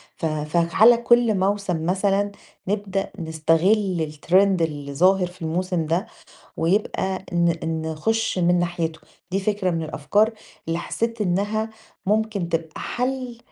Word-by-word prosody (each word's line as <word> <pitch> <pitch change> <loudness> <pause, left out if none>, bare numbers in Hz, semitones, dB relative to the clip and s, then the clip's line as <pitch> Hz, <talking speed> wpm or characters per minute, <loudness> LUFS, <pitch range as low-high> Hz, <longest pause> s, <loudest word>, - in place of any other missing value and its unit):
ف - - -4
فعَلَى 170 +9 +4
كل 235 -2 +3
موسم 190 -4 0
مثلًا 195 +2 +1 0.4
نبدأ 200 -1 -2
نستغل 165 +2 +1
الtrend 155 +3 -9 0.3
اللي 145 -3 -2
ظاهر 185 +4 +3
في 180 -1 -16
الموسم 170 +1 -1
ده، 170 +7 0 0.5
ويبقى 190 +1 0
ن 165 -2 0
نخش 225 +6 0
من 175 0 +3
ناحيته، 170 -2 -2 0.3
دي 195 - 0
فكرة 200 -2 0
من 165 -1 -1
الأفكار 205 +9 +1 0.4
اللي 165 +1 0
حسيت 230 +5 -3
إنها 205 +3 0 0.4
ممكن 210 -4 0
تبقى 165 -2 -3
حل 250 -1 -3
185 Hz, 125 wpm, -23 LUFS, 165-210 Hz, 0.5 s, فعَلَى